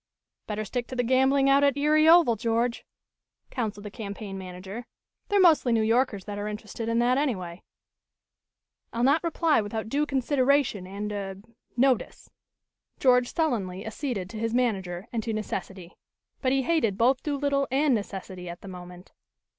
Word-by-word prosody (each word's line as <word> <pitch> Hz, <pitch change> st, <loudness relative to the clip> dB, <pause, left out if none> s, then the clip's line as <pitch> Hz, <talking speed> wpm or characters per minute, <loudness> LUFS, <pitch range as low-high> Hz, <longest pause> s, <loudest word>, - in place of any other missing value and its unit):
"Better 215 Hz, 0 st, -3 dB
stick 245 Hz, +4 st, -3 dB
to 255 Hz, -, -7 dB
the 245 Hz, -, +1 dB
gambling 265 Hz, +2 st, +3 dB
out 275 Hz, +1 st, +5 dB
at 280 Hz, -1 st, +3 dB
Erie 305 Hz, +2 st, +4 dB
Oval, 330 Hz, -9 st, +6 dB
George," 230 Hz, +2 st, -1 dB, 0.7 s
counseled 215 Hz, -5 st, -3 dB
the 210 Hz, -, -6 dB
campaign 200 Hz, -2 st, -7 dB
manager. 190 Hz, +4 st, -8 dB, 0.4 s
"They're 410 Hz, -1 st, +3 dB
mostly 320 Hz, -9 st, +5 dB
New 225 Hz, -1 st, +3 dB
Yorkers 225 Hz, -3 st, +1 dB
that 205 Hz, -1 st, -5 dB
are 205 Hz, -, -3 dB
interested 215 Hz, +2 st, -5 dB
in 230 Hz, -, +1 dB
that, 245 Hz, +3 st, +3 dB
anyway." 185 Hz, -11 st, -3 dB, 1.3 s
"I'll 235 Hz, -, -2 dB
not 285 Hz, +6 st, +3 dB
reply 330 Hz, -5 st, +2 dB
without 220 Hz, +1 st, -4 dB
due 295 Hz, +4 st, 0 dB
consideration 265 Hz, -6 st, +1 dB
and 205 Hz, +2 st, -5 dB
er 195 Hz, -2 st, -4 dB, 0.4 s
notice," 255 Hz, -2 st, 0 dB, 0.7 s
George 250 Hz, -2 st, +4 dB
sullenly 210 Hz, -, -1 dB
acceded 220 Hz, -4 st, -4 dB
to 220 Hz, -, -6 dB
his 225 Hz, +1 st, -1 dB
manager 195 Hz, -6 st, -1 dB
and 230 Hz, -, 0 dB
to 225 Hz, 0 st, -3 dB
necessity. 190 Hz, -4 st, -5 dB, 0.5 s
But 255 Hz, -, +1 dB
he 270 Hz, 0 st, +2 dB
hated 265 Hz, -11 st, +1 dB
both 255 Hz, +4 st, +3 dB
Doolittle 280 Hz, -1 st, 0 dB
and 275 Hz, +2 st, +2 dB
necessity 190 Hz, -4 st, -5 dB
at 170 Hz, -, -8 dB
the -, -, -11 dB
moment. 180 Hz, 0 st, -10 dB
230 Hz, 160 wpm, -27 LUFS, 200-270 Hz, 1.3 s, Oval